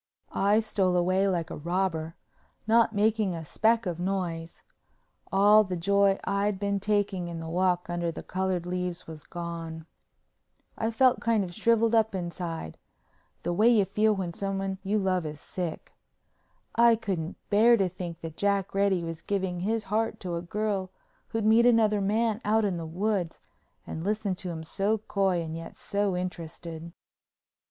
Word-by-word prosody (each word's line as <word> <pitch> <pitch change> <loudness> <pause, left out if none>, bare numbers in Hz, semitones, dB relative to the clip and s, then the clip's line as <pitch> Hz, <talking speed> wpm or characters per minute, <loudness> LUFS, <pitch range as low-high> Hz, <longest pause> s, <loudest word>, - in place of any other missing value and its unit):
I 205 +3 +3
stole 190 -4 +1
away 185 +2 +2
like 175 -4 -1
a - - -4
robber, 165 0 -2 0.5
not 225 +1 +4
making 210 -2 +1
a 165 - -5
speck 225 +7 +2
of 175 -2 -3
noise. 175 -3 -3 0.7
All 205 +2 +6
the 185 -3 -4
joy 200 +2 +3
I'd 200 0 0
been 200 0 0
taking 200 -3 0
in 170 -1 -5
the 165 - -6
walk 180 +1 +1
under 175 -1 -2
the - - -8
colored 185 -2 -2
leaves 180 0 -3
was 155 -2 -10
gone. 165 -2 -6 0.9
I 225 - -1
felt 250 +2 +3
kind 230 -3 +2
of 175 -2 -6
shriveled 230 +2 +2
up 220 -2 +3
inside—the 170 - -7
way 215 +6 +5
you 215 -5 +4
feel 215 +2 +2
when 180 -3 -3
someone 195 0 -3
you 205 +2 +1
love 185 -3 +1
is 150 -1 -6
sick. 175 +1 -5 0.8
I 235 0 +6
couldn't 190 -6 -3
bear 230 +3 +6
to 195 -3 +2
think 175 -2 -7
that 160 -1 -7
Jack 200 0 0
Reddy 195 -3 +2
was 165 -1 -5
giving 190 -3 -2
his 220 +4 -1
heart 220 +3 -1
to 180 -2 -3
a 170 - -3
girl 200 +1 -2 0.4
who'd 225 -1 -2
meet 225 +2 +6
another 215 -3 +4
man 215 +2 +1
out 220 +1 +2
in 190 -4 -1
the 165 -1 -5
woods 185 0 -1 0.5
and 160 - -5
listen 205 0 0
to 180 0 -5
him 160 -2 -5
so 200 +6 0
coy 195 -4 0
and 160 0 -5
yet 165 0 -8
so 200 -3 -1
interested. 170 -2 -6
190 Hz, 165 wpm, -28 LUFS, 175-210 Hz, 0.9 s, All